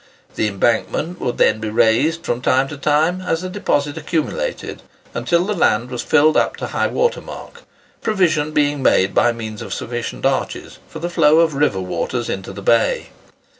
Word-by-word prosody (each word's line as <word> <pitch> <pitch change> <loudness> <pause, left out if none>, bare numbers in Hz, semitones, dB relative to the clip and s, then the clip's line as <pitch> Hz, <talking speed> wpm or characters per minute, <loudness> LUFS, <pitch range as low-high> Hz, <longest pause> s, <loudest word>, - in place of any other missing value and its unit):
The 110 - 0
embankment 120 - -1
would 120 - -2
then 110 - +3
be 110 0 -3
raised 120 +10 +2
from 120 +1 -2
time 130 +1 +2
to 145 - -6
time 155 +5 +1
as 180 -2 -2
the 185 - -4
deposit 145 -7 -1
accumulated, 170 - -3 0.3
until 175 +1 +1
the 210 - -1
land 125 - +1
was 125 - -3
filled 155 0 +3
up - - +2
to - - -5
high - - 0
water 485 0 0
mark; - - -10 0.4
provision 165 -8 +1
being 145 -2 +1
made 95 -6 +3
by 120 - +4
means 110 -2 -7
of - - -5
sufficient 120 0 -5
arches, - - -2
for - - -10
the 175 - -3
flow 160 -3 +4
of 165 -1 +2
the 140 - -5
river 145 -10 +2
waters 95 +7 -3
into 95 -1 -5
the 100 - -9
bay. 115 +1 +2
145 Hz, 185 wpm, -19 LUFS, 115-165 Hz, 0.4 s, by